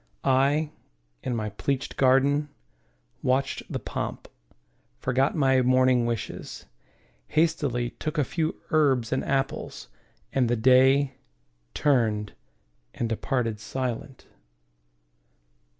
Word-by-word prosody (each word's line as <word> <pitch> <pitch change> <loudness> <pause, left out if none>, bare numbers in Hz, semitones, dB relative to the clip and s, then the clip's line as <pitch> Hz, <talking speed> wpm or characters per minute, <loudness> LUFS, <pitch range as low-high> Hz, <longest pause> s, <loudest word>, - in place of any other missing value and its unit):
I, 140 +4 +2 0.5
in 125 - -2
my 110 -2 -2
pleached 135 +6 -2
garden, 140 +3 +3 0.7
watched 135 +2 0
the - - -1
pomp, - - -5 0.7
Forgot 130 - +1
my 135 -4 +3
morning 130 -1 +3
wishes, 115 -3 -5 0.6
hastily 145 -7 +1
Took 155 +1 -5
a 150 - +3
few 160 +3 -2
herbs 135 -7 +2
and 130 - 0
apples, 135 0 -2 0.4
and 125 -3 +2
the 120 - +2
Day 130 +3 +4 0.6
Turned 110 -7 +1 0.6
and 120 - -1
departed 115 -1 -1
silent. 130 +2 -5
130 Hz, 100 wpm, -26 LUFS, 120-140 Hz, 0.7 s, Day